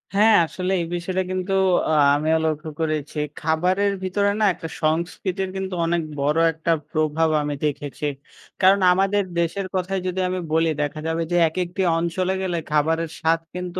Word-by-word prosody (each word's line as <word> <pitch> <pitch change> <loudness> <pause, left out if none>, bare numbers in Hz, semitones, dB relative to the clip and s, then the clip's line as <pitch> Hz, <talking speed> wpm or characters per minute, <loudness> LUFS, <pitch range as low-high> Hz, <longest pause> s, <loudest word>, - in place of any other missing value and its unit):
হ্যাঁ, 215 +2 +6
আসলে 185 +3 -4
এই - - -2
বিষয়টা 185 +2 -2
কিন্তু 185 +1 -2 0.4
আ - - +2 0.2
আমিও 155 +2 +2
লক্ষ্য 155 0 -2
করেছি। 155 -2 -2 0.2
খাবারের 185 +5 +1
ভিতরে 200 +2 +1
না 215 - +3
একটা 165 - -7 0.2
সংস্কৃতির 180 +4 -1
কিন্তু 190 0 -4
অনেক 170 0 +1 0.2
বড় 150 +3 +1
একটা 160 +1 -2 0.2
প্রভাব 155 +1 +1
আমি 145 0 -2
দেখেছি। 145 0 -3 0.6
কারণ 190 +2 +6
আমাদের 195 +2 +2 0.2
দেশের 180 +3 -1
কথাই 185 +1 -1
যদি 185 +1 -2
আমি 185 0 -2
বলি 165 0 +3
দেখা 150 +1 -3
যাবে 160 +1 -1
যে, - - +1
একেকটি 180 +2 -3 0.2
অঞ্চলে 180 +3 -1
গেলে 180 -2 -1
খাবারের 160 +2 +1
স্বাদ 165 +1 +2 0.2
কিন্তু 180 0 -4
170 Hz, 160 wpm, -22 LUFS, 160-185 Hz, 0.6 s, হ্যাঁ